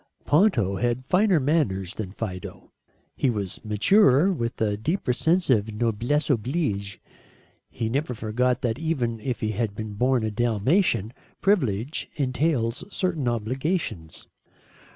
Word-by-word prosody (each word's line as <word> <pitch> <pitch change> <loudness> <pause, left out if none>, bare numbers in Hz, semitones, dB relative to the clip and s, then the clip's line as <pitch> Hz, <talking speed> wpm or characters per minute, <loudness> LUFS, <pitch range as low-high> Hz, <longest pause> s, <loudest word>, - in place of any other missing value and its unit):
Ponto 145 - +3
had 120 +2 -1
finer 185 +1 +3
manners 115 - 0
than 100 -4 -5
Fido. 95 -4 -7 0.4
He 135 - +1
was 100 -4 -4
maturer, 140 - +4
with 115 -7 -3
a 105 -2 +1
deeper 135 - -1
sense 170 +7 +2
of 110 -2 +2
noblesse 120 +6 0
oblige. 120 - -1 0.7
He 115 - -3
never 130 +2 -1
forgot 125 +3 0
that 120 +1 -1
even 130 -8 -1
if 120 0 -4
he 110 - 0
had 110 -1 -2
been 110 0 -5
born 125 +2 +1
a 110 - -1
Dalmatian, 120 - +1 0.3
privilege 135 - 0
entails 130 -2 0
certain 175 -9 -1
obligations. 120 - -2
120 Hz, 130 wpm, -25 LUFS, 110-150 Hz, 0.7 s, maturer